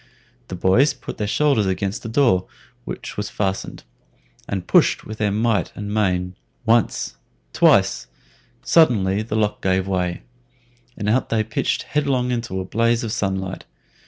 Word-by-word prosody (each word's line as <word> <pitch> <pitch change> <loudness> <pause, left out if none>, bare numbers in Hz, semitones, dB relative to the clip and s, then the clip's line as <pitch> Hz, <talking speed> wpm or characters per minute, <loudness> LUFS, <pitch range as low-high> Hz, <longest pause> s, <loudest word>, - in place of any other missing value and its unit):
The 95 - -6
boys 95 +11 +3
put - - -9
their 105 - -1
shoulders 130 -4 +2
against 95 +4 -2
the 115 - -6
door, 115 -7 +2 0.4
which - - -7
was - - -3
fastened, 95 -1 -3 0.7
and 95 -3 -3
pushed - - +3
with 110 0 -7
might 105 +1 +1
and 105 0 -5
main 90 -4 0 0.3
once, 115 0 +1 0.4
twice; - - +3 0.6
suddenly 105 - +3
the 110 0 -4
lock 105 -1 0
gave 95 0 +1
way, 90 -2 -2 0.7
and 105 - -3
out 120 +5 +1
they 110 -1 +1
pitched 115 +1 -1
headlong 135 -4 0
into 115 -6 -3
a 95 - -4
blaze 115 +4 +1
of 115 - -3
sunlight. 95 -4 -3
105 Hz, 145 wpm, -21 LUFS, 95-115 Hz, 0.7 s, boys